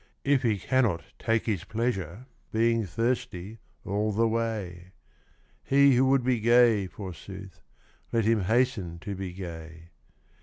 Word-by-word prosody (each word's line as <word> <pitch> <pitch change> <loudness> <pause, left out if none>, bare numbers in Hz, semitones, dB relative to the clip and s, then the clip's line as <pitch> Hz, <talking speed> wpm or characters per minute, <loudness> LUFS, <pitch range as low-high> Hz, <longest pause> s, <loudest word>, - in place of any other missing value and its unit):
If 140 -2 +3
he 110 -4 +1
cannot 105 -5 +1 0.2
take 115 -1 0
his 100 -6 -1
pleasure, 110 -2 -3 0.3
Being 115 -1 +2
thirsty 115 -1 -2 0.3
all 105 +2 0
the 115 +3 +2
way? 105 -6 -3 0.7
He 140 0 +5
who 130 +2 +4
would 135 -1 +3
be 125 -1 +1
gay, 115 -3 +4
forsooth, 95 -1 -9 0.5
Let 115 -2 +1
him 110 -1 +3
hasten 110 -6 +1
to 100 - -5
be 95 -1 -5
gay. 85 -2 -9
110 Hz, 130 wpm, -27 LUFS, 95-120 Hz, 0.7 s, He